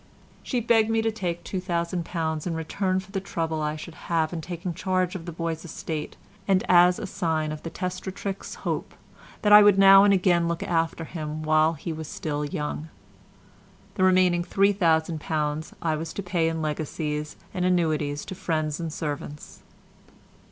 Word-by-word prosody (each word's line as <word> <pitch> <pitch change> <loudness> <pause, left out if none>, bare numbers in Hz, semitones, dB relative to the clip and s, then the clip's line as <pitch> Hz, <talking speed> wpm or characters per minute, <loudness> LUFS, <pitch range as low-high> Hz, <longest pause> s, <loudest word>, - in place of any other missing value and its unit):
She 250 -3 -1
begged 225 -1 +3
me 225 0 +1
to 225 - +1
take 175 -6 -3
£2000 170 -3 -2
in 165 - -2
return 185 +4 -1
for 190 +1 -11
the 195 - -1
trouble 160 -4 -2
I 150 0 -1
should 155 +2 -8 0.2
have 165 -1 +1
in 165 - -3
taking 175 +2 -5
charge 185 +1 0
of 180 -2 -7
the - - -3
boy's 165 -1 -3
estate, 160 -2 -5 0.3
and 190 -2 +3
as 180 0 +6
a - - -4
sign 160 -5 -1
of 155 0 -6
the 165 - -5
testatrix's 185 +3 -5
hope - - -3 0.5
that 210 -1 +5
I 210 - +11
would 205 -1 +6
now 195 0 +9
and 205 - +5
again 180 -3 +3
look 170 0 -2
after 165 -1 0
him 155 -2 -5
while 155 +1 +3
he 165 +2 -5
was 160 -1 -6
still 150 -1 -3
young. 150 +1 -4 1.0
The 185 - 0
remaining 185 -2 +4
£3000 160 -5 +1
I 160 -2 +1
was 160 +1 -5
to 200 - -4
pay 175 -3 +1
in 160 -1 -3
legacies 150 0 -3 0.2
and 180 -2 -1
annuities 155 -5 +1
to - - -6
friends 155 -4 -2
and 165 -2 -3
servants. 150 -1 -6
170 Hz, 170 wpm, -26 LUFS, 155-185 Hz, 1.0 s, I